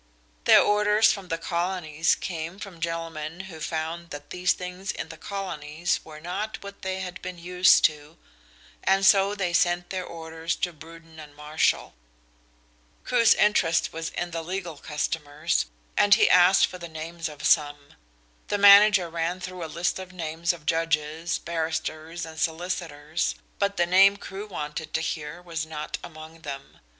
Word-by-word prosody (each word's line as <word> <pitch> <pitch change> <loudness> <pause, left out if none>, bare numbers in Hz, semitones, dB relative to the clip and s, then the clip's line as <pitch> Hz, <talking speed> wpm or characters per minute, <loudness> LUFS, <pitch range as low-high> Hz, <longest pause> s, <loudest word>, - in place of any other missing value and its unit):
Their - - +8
orders 210 +1 +4
from 195 -3 -5
the 165 - -2
Colonies 170 -2 0
came 170 0 -5
from 195 -4 -9
gentlemen 165 0 -4
who 185 -4 -10
found 165 +2 -4
that 145 -1 -9
these 180 0 +1
things 180 +2 -5
in - - -6
the 165 - -8
Colonies 170 -4 -3
were 155 -1 -11
not 195 +7 -5
what 200 0 -10
they 190 0 -3
had 180 -1 -6
been 180 0 -6
used 180 +1 +4
to, 150 +1 -1 0.7
and 195 0 +3
so 195 +1 +5
they 185 -4 -2
sent 175 0 +1
their 185 -1 -2
orders 165 -1 -4
to 175 - -2
Bruden 165 +1 -14
and 150 -1 -12
Marshall. 150 +1 0 1.1
Crewe's 235 -2 +4
interest 185 -6 +2
was 165 0 -4
in 175 0 -4
the 165 0 -3
legal 175 -2 -5
customers 150 +1 -2 0.3
and 205 -1 +6
he - - +4
asked 180 +2 +6
for 180 - -9
the 170 -1 -8
names 160 +1 -5
of 150 -1 -11
some. 145 -2 +2 0.5
The 205 - 0
manager 200 -2 +8
ran 170 +2 -2
through 180 -1 -6
a - - -4
list 170 +3 -1
of 185 0 -8
names 170 -1 -2
of 165 -4 -11
judges, 160 +1 0
barristers 165 0 -3
and 160 0 -10
solicitors, 160 -2 -2 0.2
but 200 0 0
the 175 - +3
name 195 +3 +6
Crewe 200 +1 -8
wanted 150 -4 -5
to 160 - +1
hear 160 +1 -4
was 165 -2 -4
not 150 -1 -5
among 160 0 -11
them. 140 -3 -8
170 Hz, 160 wpm, -26 LUFS, 160-185 Hz, 1.1 s, Their